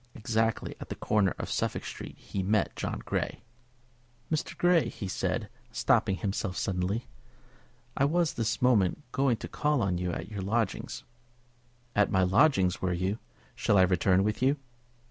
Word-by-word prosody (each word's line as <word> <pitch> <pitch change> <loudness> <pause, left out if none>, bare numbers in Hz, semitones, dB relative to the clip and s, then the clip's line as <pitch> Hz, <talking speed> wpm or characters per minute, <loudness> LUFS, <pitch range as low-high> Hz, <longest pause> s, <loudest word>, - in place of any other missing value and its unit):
Exactly 115 -1 0
at - - -8
the - - -4
corner 100 -3 +1
of - - -5
Suffolk - - -1
Street - - -7
he 95 - -4
met 100 +1 +1
John - - -4
Grey. - - -2 0.9
"Mr. 160 +1 -2
Grey," 175 -2 +4
he 100 - -6
said, 95 - -1 0.2
stopping 95 - +2
himself 95 -1 -2
suddenly, 95 +5 -1 0.9
"I 135 - +3
was 165 +2 +2
this 115 +1 -1
moment 120 - +3
going 130 -3 +2
to - - -6
call 150 -5 +1
on 90 -3 0
you 90 0 -1
at - - -5
your 100 -2 -4
lodgings." 110 +5 -1 0.9
"At 105 -1 +4
my 95 0 +3
lodgings, 95 - +3
were 90 -1 0
you? 95 +5 -1 0.3
Shall 100 - +2
I 95 - +7
return 90 +1 +3
with 105 +2 -1
you?" 135 +3 +3
105 Hz, 160 wpm, -29 LUFS, 95-125 Hz, 0.9 s, I